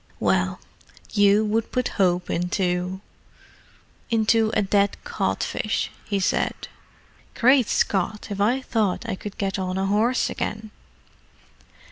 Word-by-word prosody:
"Well, - - +1 0.5
you 205 +1 +4
would 220 +1 -1
put 250 0 0
hope 180 -2 +2
into—into 180 +1 -1 1.5
a - - +3
dead 200 0 +2
codfish!" - - -2
he 200 -2 -1
said. 185 - 0 0.8
"Great 255 -1 +4
Scott, 205 +2 0
if 200 0 -3
I 245 +6 +2
thought 220 -3 -1
I 225 - -2
could 200 +1 -7
get 195 -1 -2
on 185 0 -2
a 190 - 0
horse 220 +6 +2
again!" 215 0 -4
200 Hz, 115 wpm, -24 LUFS, 190-220 Hz, 1.5 s, you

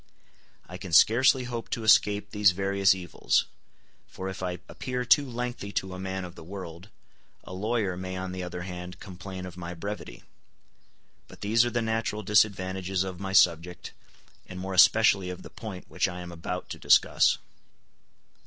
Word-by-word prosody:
I 90 - -8
can 90 -3 -8
scarcely 125 +8 +5
hope 120 -2 -5
to 115 - -3
escape 105 -1 +4
these 105 -3 +4
various 100 0 +2
evils; 90 -2 0 0.6
for 95 0 -6
if 95 - -7
I 90 -1 -3
appear 125 -1 -4
too 140 +1 +4
lengthy 120 -4 -4
to 95 -1 -2
a 90 - -7
man 95 0 -4
of 90 - -10
the 90 - -12
world, 90 +1 -9 0.5
a - - -10
lawyer 105 -1 -1
may 95 +1 -5
on 95 0 -4
the 90 0 -5
other 90 0 -5
hand 90 0 -8
complain 95 0 -8
of 90 -1 -9
my 90 0 -6
brevity. 100 -8 -7 1.0
But - - -15
these 110 +3 +3
are - - 0
the 120 -1 -1
natural 110 -1 -2
disadvantages 95 -2 +1
of 95 -2 -6
my 95 -1 -4
subject, 90 0 +2 0.6
and 90 - -8
more 95 +1 -4
especially 95 -1 +5
of 90 - -7
the - - -11
point 95 -5 -8
which - - 0
I 90 -1 -6
am 90 0 -8
about 85 +2 -5
to - - -7
discuss. - - +4
95 Hz, 170 wpm, -27 LUFS, 90-105 Hz, 1.0 s, scarcely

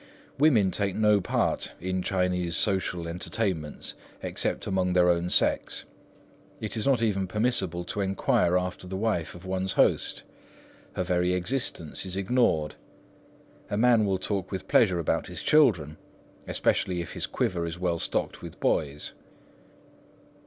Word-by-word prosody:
Women 120 -11 +4
take 100 -1 -1
no 105 -2 +4
part 90 - 0
in 95 +1 -2
Chinese 90 -2 0
social 95 -4 0
entertainments 85 -2 -3 0.3
except - - -1
among 95 -1 0
their 90 -1 +5
own 85 +1 0
sex. - - +1 0.7
It 110 - -3
is 110 +3 -1
not 130 -4 +3
even 100 -4 0
permissible 95 -5 0
to 100 +4 -3
enquire 95 -2 +2
after 90 0 -4
the 95 +1 -4
wife 100 -7 -1
of 85 +2 -12
one's 95 0 -1
host. - - +2 0.7
Her 90 - -1
very 90 0 +1
existence 90 - -1
is 95 -1 -4
ignored. 95 -8 +1 1.0
A 105 - -1
man 115 -1 +5
will 95 -2 +1
talk 95 0 -3
with 95 -1 -5
pleasure 95 -6 +4
about 85 - -1
his - - -7
children, 90 - +3 0.5
especially 90 -2 +1
if 85 - -7
his - - -3
quiver 85 -2 -1
is 85 +1 -5
well 90 -2 -1
stocked - - -2
with - - -10
boys. 75 -1 -1
95 Hz, 145 wpm, -27 LUFS, 90-105 Hz, 1.0 s, their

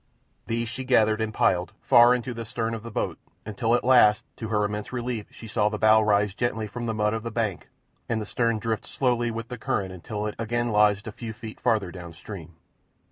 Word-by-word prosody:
These 115 +1 -1
she 130 +3 -5
gathered 110 -4 +3
and 110 -1 -1
piled 90 -3 +1
far 120 +1 +6
in 125 - -3
the 115 -2 -5
stern 115 0 -3
of 115 - -4
the 115 - -8
boat, 105 - -3 0.3
until 115 +3 +1
at - - 0
last, 120 -5 +5
to 110 - -5
her 105 -1 +1
immense 105 0 -4
relief, 120 -3 -3
she 115 - -11
saw 105 0 +1
the 105 - -3
bow 110 +1 +5
rise 105 -2 +2
gently 110 -1 -1
from 120 +3 -5
the 115 - -1
mud 105 0 +1
of 110 - -2
the 115 - -4
bank 110 -5 -2 0.4
and 115 -2 0
the 105 - -4
stern 115 +1 0
drift 110 0 -3
slowly 120 -3 0
with 115 0 -5
the 125 -2 -6
current 100 -3 -1
until 105 +4 -5
it 105 - -2
again 120 +1 -1
lodged 105 -1 +3
a 110 - -5
few 110 +1 -7
feet 110 0 -9
farther 110 -7 +1
down 85 -2 -9
stream. 85 -1 -10
110 Hz, 225 wpm, -26 LUFS, 105-115 Hz, 0.4 s, far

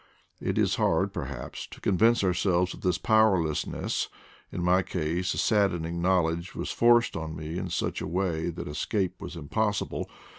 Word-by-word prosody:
It - - -2
is - - +2
hard, 95 +4 +1
per 85 -7 -3
haps, 70 -2 -7
to - - -12
convince 115 +4 +3
ourselves 90 0 +1
of - - -12
this 90 - +1
powerlessness; 95 -9 +1 0.4
in 90 - -3
my 90 +1 +4
case 90 +1 -2
the - - -5
saddening 85 -5 +1
knowledge 85 -1 +1
was - - -3
forced 120 0 +4
on 80 -1 -4
me 80 +2 -5
in 90 - -4
such 85 - -2
a - - -3
way 85 -1 -1
that 85 - -6
escape 95 +5 -2
was 80 - -7
impossible. 100 +6 -2
90 Hz, 170 wpm, -28 LUFS, 80-95 Hz, 0.4 s, my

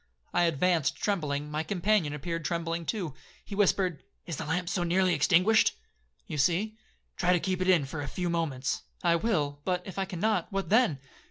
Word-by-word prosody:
I 175 - +4
advanced 165 -1 +2
trembling, 150 -7 -2
my 155 +1 -1
companion 185 -1 +1
appeared 165 +3 -4
trembling 170 +1 -2
too. 180 - -2 0.3
He - - -8
whispered, 190 -5 +2 0.2
'Is 165 -5 -5
the - - -5
lamp 175 +3 -1
so 175 0 -1
nearly 180 +1 +2
extinguished?'—'You 150 - +1
see.'—'Try 180 +1 -1
to 175 - +3
keep 185 +1 -2
it 185 - +1
in 170 -6 +4
for 145 +2 -5
a 145 - -4
few 180 -2 -3
moments.'—'I 165 +1 -1
will; 150 -9 -1
but, 180 +1 -1
if 195 0 -6
I 195 - 0
cannot, 190 +1 -1
what 195 0 -2
then?' 220 - +4
175 Hz, 170 wpm, -29 LUFS, 155-190 Hz, 0.3 s, I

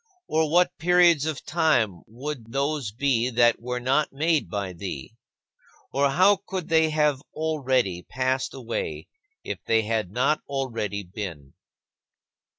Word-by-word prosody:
Or 160 0 +1
what 175 +3 +2
periods 170 -2 +4
of 155 -3 -4
time 120 - +1
would 120 0 -7
those 140 -4 -1
be 125 0 +1
that 120 -1 +3
were 125 +1 -3
not 135 +5 +1
made 150 - +1
by 100 -1 -3
thee? 85 -7 -6 0.8
Or 140 +1 +3
how 185 +8 +5
could 185 -3 -4
they 160 -1 +4
have 150 -3 +1
already 130 - 0
passed 130 +5 -2
away 120 -3 -4 0.3
if - - -5
they 115 -1 +3
had 110 -3 -1
not 130 +9 +1
already 115 -7 -2
been? 85 -8 -7
130 Hz, 135 wpm, -25 LUFS, 110-155 Hz, 0.8 s, how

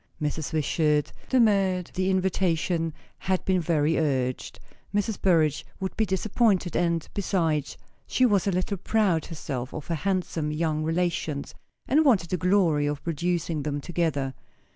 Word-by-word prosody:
Mrs. 150 0 -2
Wishart 150 -1 +1 0.2
demurred; 195 -7 +2
the 185 +1 0
invitation 180 -3 +1 0.3
had 185 -1 -1
been 185 -1 +2
very 160 -1 +1
urgent; 130 -5 -1 0.4
Mrs. 205 +1 -1
Burrage 160 -6 +3 0.2
would 190 0 -4
be 220 - +1
disappointed; 190 -1 +1
and, 170 -2 +1
besides, 165 -7 0 0.3
she 255 - +3
was 205 -5 +2
a - - +3
little 185 +2 -1
proud 190 -4 +1
herself 135 -6 -5
of 155 - -6
her 170 - -2
handsome 170 -3 -1
young 155 0 -1
relations, 165 -3 -1 0.3
and 300 +4 +4
wanted 205 - +3
the 180 - +1
glory 170 -5 +2
of 145 0 -3
producing 170 -1 -1
them 145 0 -2
together. 145 -5 -1
170 Hz, 140 wpm, -26 LUFS, 155-190 Hz, 0.4 s, and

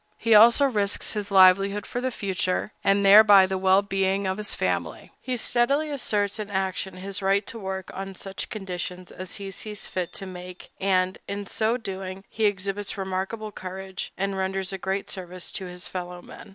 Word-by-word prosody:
He 230 -1 +2
also 235 +6 +8
risks 205 -6 0
his 210 -1 -3
livelihood 195 +1 +5
for 245 - -4
the 260 - 0
future, 190 -3 -1
and 200 0 +3
thereby 200 -1 +9
the 190 0 -2
well 190 +1 +4
being 195 0 0
of 190 +2 -1
his 210 - -3
family. 85 -4 -2
He 255 -1 -2
steadily 275 +7 +1
asserts 210 -6 -1
in 210 -1 -4
action 190 -1 -2
his 195 +1 -4
right 195 +1 +2
to 230 - -5
work 190 -2 -5
on 195 0 -6
such 195 +1 -5
conditions 180 -3 -6
as 185 -1 -7
he 195 -1 -6
sees 210 +2 -5
fit 180 -2 -3
to 195 - -5
make, 180 -1 -10
and, 185 -1 +1
in 200 0 -4
so 220 +4 0
doing, 195 -3 -6
he 220 - -1
exhibits 200 +1 -1
remarkable 190 +3 -3
courage, 190 0 -6
and 195 0 -1
renders 190 0 -2
a 190 - -4
great 190 +2 -2
service 180 -1 -6
to 190 - -4
his 180 0 -7
fellow 180 -1 -6
men. - - -12
195 Hz, 185 wpm, -25 LUFS, 185-205 Hz, -, thereby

